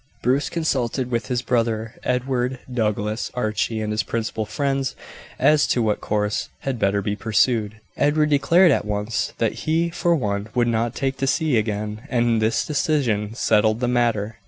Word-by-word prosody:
Bruce 135 +2 +1
consulted 130 -6 -1
with 115 -3 -1
his 125 -1 -1
brother 115 -2 0
Edward, 125 0 -1 0.2
Douglas, 105 -1 -1
Archie, 110 -1 -1
and 105 0 -2
his 105 - +1
principal 110 -1 -3
friends 135 -2 -1 0.4
as 150 -1 +4
to 120 - +1
what 105 -1 0
course 105 0 -1
had 135 -3 -3
better 100 0 +1
be 105 +1 -1
pursued. 110 0 +1 0.2
Edward 150 +1 +2
declared 170 +5 +5
at - - +2
once 105 +2 -2
that 115 +5 -2
he 165 +2 +2
for 175 0 +1
one 105 -6 -2
would 120 -1 +2
not 115 0 0
take 135 -1 -1
to 135 - -1
sea 155 0 +1
again; 105 -1 -2
and 120 -2 +2
this 110 +1 +1
decision 125 -8 0
settled 110 -1 +2
the 125 - 0
matter. 115 -3 0
115 Hz, 165 wpm, -22 LUFS, 110-135 Hz, 0.4 s, declared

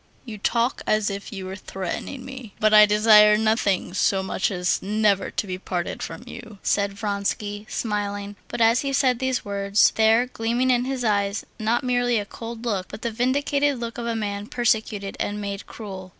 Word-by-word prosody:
"You 220 -4 -8
talk 235 +4 0
as 215 -1 +2
if 200 0 -6
you 195 -3 -6
were 190 +1 -6
threatening 195 +7 -6
me. 260 -5 -9
But 215 0 +3
I 210 0 +9
desire 210 0 +6
nothing 215 -4 +1
so 195 0 +1
much 190 - -1
as 180 -2 0
never 205 -1 +1
to - - -2
be 185 -1 -5
parted 180 -2 -4
from - - -6
you," 220 -3 -10
said 200 -1 +1
Vronsky, 205 0 -3
smiling. 205 -2 -3
But - - -4
as 230 +1 +5
he 275 -1 -2
said 255 -3 +2
these 260 -1 -1
words 200 0 +3
there 225 +2 +4
gleamed 245 +1 0
in 245 0 +2
his 260 -1 -3
eyes 200 -2 0
not 225 +4 +1
merely 245 -1 +1
a 205 - -2
cold 230 +2 -8
look, 195 -5 -1
but - - -10
the 235 - -1
vindictive 280 +4 +1
look 235 0 -5
of 235 - -4
a 230 - -1
man 205 -1 -3
persecuted 215 -4 -1
and 205 0 -2
made 200 -1 -5
cruel. 190 -4 -8
215 Hz, 190 wpm, -24 LUFS, 200-235 Hz, -, I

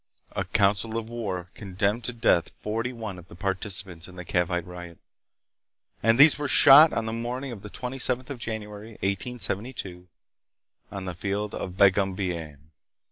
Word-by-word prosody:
A - - -1
council 105 +3 +1
of 115 -1 -4
war 95 -7 -4
condemned 100 +3 -2
to - - -1
death 115 -8 +2
forty 115 +4 -2
one 110 -6 -6
of 90 - -15
the 85 - -13
participants 95 -2 -4
in 90 - -13
the 90 -1 -8
Cavite 90 0 0
riot, 90 -2 -9 1.0
and 115 +1 +4
these 145 +2 +7
were 145 - -1
shot 145 +3 +8
on 115 - -1
the 110 - -3
morning 125 +3 -4
of 110 -5 -8
the 105 - -9
27th 130 +2 -2
of 130 - -6
January, 110 -1 -6
1872, 100 -2 -3 0.8
on 100 -1 -5
the 90 - -4
Field 100 +4 -3
of 90 0 -5
Bagumbayan. 90 -7 +1
100 Hz, 155 wpm, -26 LUFS, 90-115 Hz, 1.0 s, shot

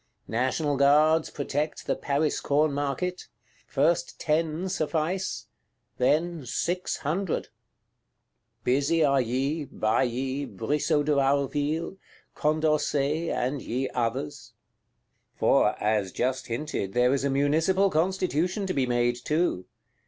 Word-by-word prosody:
National 130 +5 0
Guards 155 +3 +4
protect 145 +2 -3
the - - 0
Paris 145 +2 0
Corn 150 +1 +2
Market: 145 +6 -2 0.4
first 155 +5 +1
ten 160 +2 0
suffice; 180 +1 -2 0.5
then 155 +5 +1
six 170 +9 -2
hundred. 170 +4 -2 1.1
Busy 145 +6 +2
are 140 -2 +3
ye, 135 +6 -1
Bailly, 130 +4 -1
Brissot 145 - 0
de 150 - +1
Warville, 145 +5 0 0.4
Condorcet, 155 0 +1
and 130 +2 -1
ye 130 +4 -2
others! 115 - -3 0.8
For, - - +3
as 105 -3 0
just 130 +4 -1
hinted, 115 -5 -3
there 125 +1 +3
is 140 - 0
a 140 - +1
Municipal 160 +8 +2
Constitution 180 +3 0
to 185 - -2
be 135 -2 +1
made 120 0 +1
too. 155 - 0
145 Hz, 110 wpm, -27 LUFS, 130-160 Hz, 1.1 s, Guards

